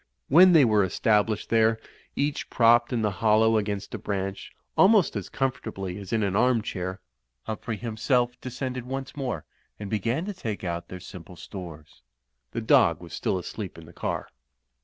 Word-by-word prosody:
When 180 +5 +8
they 155 -5 +7
were 105 -3 +4
established 105 +2 +1
there, 110 0 +3 0.4
each 145 +1 -1
propped 120 +1 +4
in 120 -3 0
the 105 - +1
hollow 110 +1 +4
against 100 -2 -4
a - - -4
branch, 100 -1 -4 0.2
almost 200 - +5
as 100 -4 -4
comfortably 110 -8 -3
as 100 -2 -9
in 110 -2 +1
an 100 -1 0
arm 125 0 +3
chair, 95 -3 -4 0.4
Humphrey 110 0 -4
himself 120 +3 0
descended 130 0 -4
once 135 +2 -5
more 125 - -3 0.3
and 105 -2 -6
began 115 - -1
to 205 - -4
take 110 - -5
out 85 -1 -3
their 90 - -8
simple 90 0 -11
stores. 85 -7 -10 0.5
The - - -3
dog - - +4
was - - -11
still - - -1
asleep 95 +1 -6
in 85 - -11
the 85 - -15
car. - - -3
110 Hz, 170 wpm, -26 LUFS, 95-125 Hz, 0.5 s, When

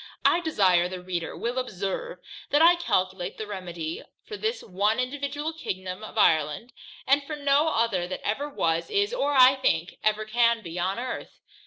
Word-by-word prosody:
I 340 - +5
desire 190 - +2
the 185 0 -6
reader 180 -2 -4
will 240 +2 -2
observe, 245 - -4 0.3
that 290 - +3
I 335 +2 +7
calculate 190 - -1
my 215 - -4
remedy 175 -5 -5 0.2
for 425 - -7
this 440 +3 -2
one 205 +4 0
individual 285 +4 -3
Kingdom 185 -9 -5
of 215 - -9
Ireland, 155 +4 +2 0.3
and 275 +2 +4
for 305 +2 -5
no 285 +1 +2
other 225 - 0
that 185 - -6
ever 275 +8 -1
was, 165 - -1
is, 410 +1 +1
or, 290 -13 0
I 255 0 +8
think, 170 -8 0
ever 215 0 +1
can 235 0 +2
be 170 0 -6
upon 185 +4 -1
Earth. 250 +1 -6
220 Hz, 175 wpm, -26 LUFS, 185-285 Hz, 0.3 s, I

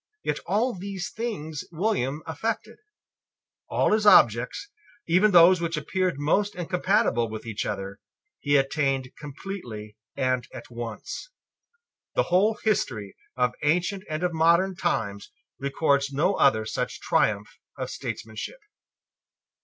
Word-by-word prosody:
Yet - - -1
all 240 +4 +1
these 195 0 -5
things 160 -10 -4
William 155 - -1
effected. 220 +8 -3 0.9
All - - +2
his 215 -1 +2
objects, 115 - +5 0.4
even 185 +5 +4
those 175 -1 +7
which 165 -1 -1
appeared 185 +2 -1
most 200 +8 +1
incompatible 175 - +1
with 110 +1 -7
each 110 -2 -3
other, 100 +1 -5 0.4
he 145 0 +1
attained 135 -2 0
completely 135 - -7 0.2
and 130 -2 0
at - - -10
once. 120 - -6 0.9
The - - +4
whole 210 +4 +4
history 115 - -1 0.2
of 125 -1 +2
ancient 180 +6 +1
and 155 +2 -3
of 180 -1 0
modern 170 +4 +3
times 100 -9 -2 0.3
records 140 0 +1
no 150 +8 +2
other 110 - +3
such - - -3
triumph 105 -1 0 0.2
of - - -4
statesmanship. 110 - -6
155 Hz, 120 wpm, -26 LUFS, 125-190 Hz, 0.9 s, those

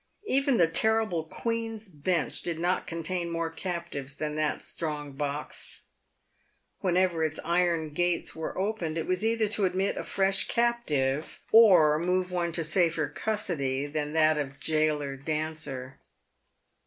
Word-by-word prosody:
Even 275 - +2
the 170 - +6
terrible 215 0 +2
Queen's 225 +3 -3
Bench 165 0 -1
did 170 -2 -3
not 175 +2 0
contain 170 +1 -3
more 165 -1 -2
captives 165 -6 -5
than 150 0 -3
that 155 -1 -1
strong 150 -3 -4
box. 145 +1 -1 1.0
Whenever 180 -3 +1
its 155 -1 -1
iron 170 -2 +1
gates 175 +2 0
were 160 0 -5
opened, 185 -5 -2
it 165 - -2
was 185 +2 0
either 225 -1 +2
to 210 -1 +1
admit 190 +2 0
a - - -3
fresh 195 0 +1
captive, 155 - 0
or 175 -10 +7
move 180 +1 0
one 175 -1 -1
to 165 - +1
safer 165 -1 +2
custody 145 -11 -1
than 150 0 -3
that 155 -1 +4
of 140 -1 -5
gaoler 155 -3 0
Dancer. 150 -3 -4
165 Hz, 140 wpm, -28 LUFS, 150-185 Hz, 1.0 s, or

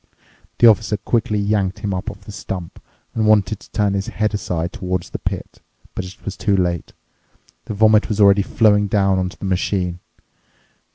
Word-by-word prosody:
The - - +5
Officer 110 -1 +4
quickly 105 +1 0
yanked 100 -2 0
him 105 -2 -3
up 95 +4 -3
off 100 -1 -11
the 100 - -11
stump 90 -3 -7 0.3
and 110 -1 0
wanted 105 -1 +3
to - - -17
turn 105 -2 0
his 100 0 -2
head 110 0 -1
aside 85 -4 -2
toward 90 -1 -2
the - - -7
pit. - - -5 0.3
But 95 - -4
it 90 0 -12
was 100 - -4
too 100 -3 +1
late. 85 -2 -1 0.7
The 105 - -5
vomit 110 0 +4
was 105 -1 -2
already 100 -1 +6
flowing 105 0 +3
down 95 -2 +2
onto 90 0 -3
the - - -7
machine. 90 -1 -1
100 Hz, 180 wpm, -20 LUFS, 95-105 Hz, 0.7 s, already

